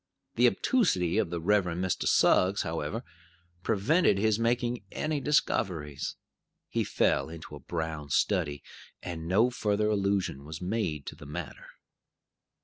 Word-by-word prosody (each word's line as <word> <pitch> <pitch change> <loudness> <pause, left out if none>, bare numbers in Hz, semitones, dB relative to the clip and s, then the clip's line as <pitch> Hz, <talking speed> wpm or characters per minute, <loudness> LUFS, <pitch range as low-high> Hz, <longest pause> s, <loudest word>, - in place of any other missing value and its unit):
The - - +5
obtusity 110 - +2
of 105 -6 0
the 85 0 -3
Reverend 90 -1 +1
Mr. 95 - -1
Suggs, 95 +3 +4
however, 80 - -3 0.6
prevented 115 - +3
his 110 +1 +2
making 120 0 0
any 155 -2 -2
discoveries. 90 - 0 0.5
He - - 0
fell - - +1
into 80 -2 -9
a - - -9
brown 80 -3 -4
study, 70 +1 +1 0.4
and 85 -2 -5
no 110 +8 +3
further 105 -2 0
allusion 100 -8 0
was 80 +2 -7
made 90 -6 -2
to - - -7
the 75 - -12
matter. 75 0 -7
95 Hz, 135 wpm, -29 LUFS, 80-110 Hz, 0.6 s, The